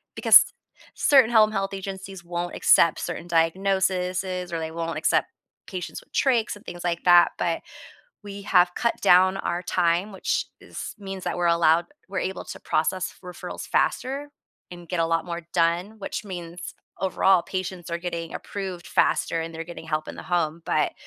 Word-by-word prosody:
because - - +8 0.5
certain 270 -5 +5
home 215 -2 +5
health 195 -1 -2
agencies 190 -1 -7
won't 175 0 -4
accept 170 - +4
certain 175 - -5
diagnosis's 185 +1 0
or 165 - -2
they 160 0 -4
won't 165 0 -3
accept - - +2 0.4
patients 180 -3 -6
with - - -34
trachs 240 -5 +1
and 205 - -16
things 175 0 -8
like 170 -1 -1
that, 175 -1 +7
but 170 -1 -1 0.6
we 200 -1 -8
have 180 -2 +3
cut 235 - +1
down 185 +2 +5
our 175 -1 -2
time, 175 +3 +1
which 190 - -1 0.2
is - - -7
means 195 -2 -7
that - - -2
we're 175 -1 +1
allowed 170 0 +4 0.2
we're 190 - -2
able 190 +1 -4
to - - -9
process 185 +4 -1
referrals 180 -1 -7
faster 275 +3 0 0.4
and 175 -1 -10
get 180 -2 -1
a 165 - +2
lot 165 0 0
more 170 -1 -5
done, 175 +5 +1
which 200 - -5
means, 175 -3 -7 0.3
overall, 190 -1 +3
patients 185 -2 -5
are 170 - -2
getting 170 -2 -5
approved 190 -3 -6
faster 165 - +1
and 165 0 -5
they're 165 +1 -5
getting 170 -1 -10
help 155 -1 -2
in - - -6
the - - -9
home, 170 -2 -1
but 155 - +1
180 Hz, 175 wpm, -25 LUFS, 170-195 Hz, 0.6 s, because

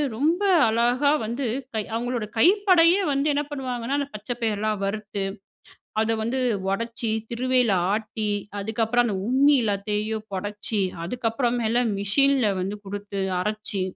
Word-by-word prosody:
ரொம்ப 325 - +1 0.2
அழகா 240 +5 +2
வந்து 240 +5 -3 0.3
கை 220 - 0
அவுங்களோட 240 -1 -2
கைப்படயே 370 - +5
வந்து 275 +1 +1
என்ன 290 +1 0
பண்ணுவாங்கன்னா? 260 -2 -3
அந்த 280 -1 -1
பச்சை 210 +4 -4
பயர்லாம் 215 -2 0
வறுத்து, 205 0 -3 0.8
அத 225 +1 +1
வந்து 235 +4 -1 0.3
ஒடைச்சி 230 +2 -2 0.2
திருவையில 250 -1 +2 0.2
ஆட்டி, 215 0 -2 0.3
அதுக்கப்பறம் 225 +3 +1
அந்த 205 - -1
உம்மி 280 +3 +5
எல்லாத்தையும் 210 +1 -2
பொடச்சு, 205 +2 -2 0.2
அதுக்கப்புறமேல 240 +2 0 0.2
மிஷின்ல 260 +3 +3
வந்து 195 +3 -3
குடுத்து 200 0 -5 0.2
அரைச்சு, 210 -1 -2
230 Hz, 120 wpm, -24 LUFS, 210-260 Hz, 0.8 s, கைப்படயே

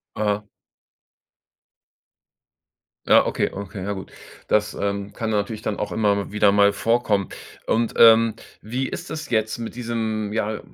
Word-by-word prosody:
Aha. 105 0 -1 2.6
Ja, - - +6
okay, - - 0
okay, 100 0 -7
ja 100 - -2
gut. 95 -1 -8 0.4
Das, 105 0 +2
ähm, 100 0 -3
kann 115 0 -3
natürlich 105 +1 -2
dann 105 - -3
auch 105 -3 -3
immer 100 -1 +1
w - - -14
wieder 105 -1 +4
mal 100 0 +4
vorkommen. 110 -4 +1 0.4
Und, 115 +1 0
ähm, 115 -1 +7 0.3
wie 125 +4 -3
ist - - -7
das 155 -1 -6
jetzt 110 -1 0
mit 115 -1 -6
diesem, 110 -3 -3
ja, 110 -1 -1
105 Hz, 145 wpm, -23 LUFS, 100-115 Hz, 2.6 s, ähm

